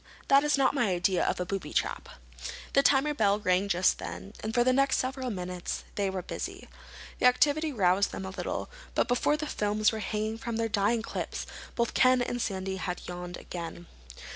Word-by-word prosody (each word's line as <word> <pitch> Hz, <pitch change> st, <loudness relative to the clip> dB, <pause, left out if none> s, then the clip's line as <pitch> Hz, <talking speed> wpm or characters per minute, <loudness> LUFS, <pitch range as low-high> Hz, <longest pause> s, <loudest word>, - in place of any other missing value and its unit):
"That 275 Hz, +1 st, +6 dB
is 295 Hz, -1 st, +2 dB
not 270 Hz, -2 st, +3 dB
my 245 Hz, -6 st, +2 dB
idea 180 Hz, 0 st, +2 dB
of -, -, 0 dB
a 180 Hz, -, -1 dB
booby 195 Hz, 0 st, -4 dB
trap." -, -, -1 dB, 0.6 s
The 275 Hz, -, +6 dB
timer 280 Hz, +2 st, +3 dB
bell 205 Hz, -7 st, +3 dB
rang 185 Hz, -1 st, +2 dB
just 185 Hz, -1 st, +2 dB
then, 200 Hz, -, -7 dB
and 220 Hz, -, -3 dB
for 240 Hz, +1 st, +3 dB
the 255 Hz, +1 st, +3 dB
next 275 Hz, +1 st, +3 dB
several 260 Hz, 0 st, -2 dB
minutes 180 Hz, -3 st, -4 dB
they 200 Hz, -1 st, 0 dB
were 190 Hz, -1 st, -4 dB
busy. -, -, -6 dB, 0.5 s
The -, -, +6 dB
activity 295 Hz, +5 st, +3 dB
roused 195 Hz, -4 st, +2 dB
them 190 Hz, -, -5 dB
a 190 Hz, -, -5 dB
little, -, -, -3 dB, 0.3 s
but -, -, +2 dB
before 250 Hz, +4 st, +2 dB
the 305 Hz, -, -3 dB
films 210 Hz, -5 st, +1 dB
were 220 Hz, -, -4 dB
hanging 215 Hz, +2 st, -2 dB
from 235 Hz, 0 st, -4 dB
their 225 Hz, 0 st, 0 dB
drying 210 Hz, +2 st, +1 dB
clips -, -, -4 dB, 0.3 s
both 235 Hz, -1 st, 0 dB
Ken 255 Hz, -1 st, +5 dB
and 245 Hz, 0 st, -2 dB
Sandy 190 Hz, -2 st, -2 dB
had 180 Hz, 0 st, -4 dB
yawned 175 Hz, 0 st, -6 dB
again. 170 Hz, 0 st, -7 dB
215 Hz, 195 wpm, -29 LUFS, 190-255 Hz, 0.6 s, That